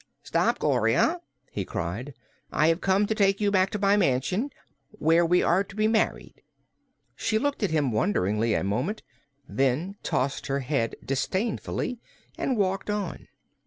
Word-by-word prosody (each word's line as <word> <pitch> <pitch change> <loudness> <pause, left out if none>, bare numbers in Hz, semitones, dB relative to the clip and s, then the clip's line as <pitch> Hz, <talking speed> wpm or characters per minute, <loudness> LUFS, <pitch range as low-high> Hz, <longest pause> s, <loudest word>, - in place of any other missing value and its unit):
"Stop, - - +1
Gloria!" 350 +2 +2 0.3
he 100 - -3
cried. 105 +11 -4 0.4
"I 155 +2 +3
have 165 +2 +1
come 195 +2 +3
to 220 - 0
take 200 -2 +2
you 205 -1 +2
back 190 -1 +3
to - - -3
my 200 0 +3
mansion, 185 - +1 0.4
where 165 +2 +3
we 175 +2 +3
are 185 +3 +3
to 195 0 -14
be 215 0 +2
married." 220 0 -1 0.7
She 220 - 0
looked 285 +4 -1
at 205 - +1
him 150 -5 +1
wonderingly 105 +1 +1
a - - 0
moment, 125 - -2 0.4
then 140 +9 0
tossed 135 +1 -1
her 140 0 -1
head 125 -4 -1
disdainfully 210 - -2 0.4
and 255 - -1
walked 195 0 0
on. 210 -4 -3
180 Hz, 155 wpm, -26 LUFS, 135-205 Hz, 0.7 s, I